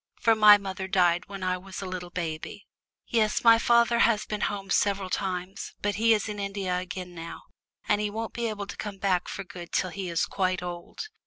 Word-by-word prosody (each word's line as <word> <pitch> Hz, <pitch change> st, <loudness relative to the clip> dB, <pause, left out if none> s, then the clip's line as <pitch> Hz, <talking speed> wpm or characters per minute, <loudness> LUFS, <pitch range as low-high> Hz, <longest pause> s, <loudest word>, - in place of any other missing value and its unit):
For 225 Hz, -, +4 dB
my 210 Hz, -1 st, +9 dB
mother 190 Hz, -1 st, -5 dB
died 180 Hz, -3 st, +2 dB
when 195 Hz, -1 st, -7 dB
I 185 Hz, 0 st, 0 dB
was 190 Hz, +1 st, -9 dB
a 195 Hz, -, -5 dB
little 185 Hz, -1 st, -5 dB
baby. 170 Hz, +2 st, -5 dB, 0.4 s
Yes, 215 Hz, -2 st, +1 dB
my 230 Hz, -1 st, +7 dB
father 235 Hz, 0 st, +4 dB
has 225 Hz, -2 st, +3 dB
been 210 Hz, -1 st, -4 dB
home 195 Hz, -1 st, -2 dB
several 195 Hz, -2 st, +1 dB
times, 185 Hz, -1 st, -3 dB
but 205 Hz, 0 st, +1 dB
he 230 Hz, 0 st, +5 dB
is 210 Hz, -, -2 dB
in 210 Hz, -1 st, -5 dB
India 195 Hz, -2 st, -2 dB
again 180 Hz, 0 st, -6 dB
now, 165 Hz, 0 st, -8 dB, 0.4 s
and 205 Hz, 0 st, +2 dB
he 210 Hz, -, 0 dB
won't 225 Hz, +2 st, -5 dB
be 235 Hz, -1 st, -2 dB
able 210 Hz, -2 st, -4 dB
to 180 Hz, -, -9 dB
come 205 Hz, -2 st, -5 dB
back 190 Hz, -2 st, +1 dB
for 195 Hz, -, -5 dB
good 175 Hz, -2 st, -10 dB
till 185 Hz, -, 0 dB
he 190 Hz, -1 st, -5 dB
is 170 Hz, -1 st, +1 dB
quite 185 Hz, -2 st, -1 dB
old. 175 Hz, -1 st, -6 dB
195 Hz, 215 wpm, -27 LUFS, 180-210 Hz, 0.4 s, my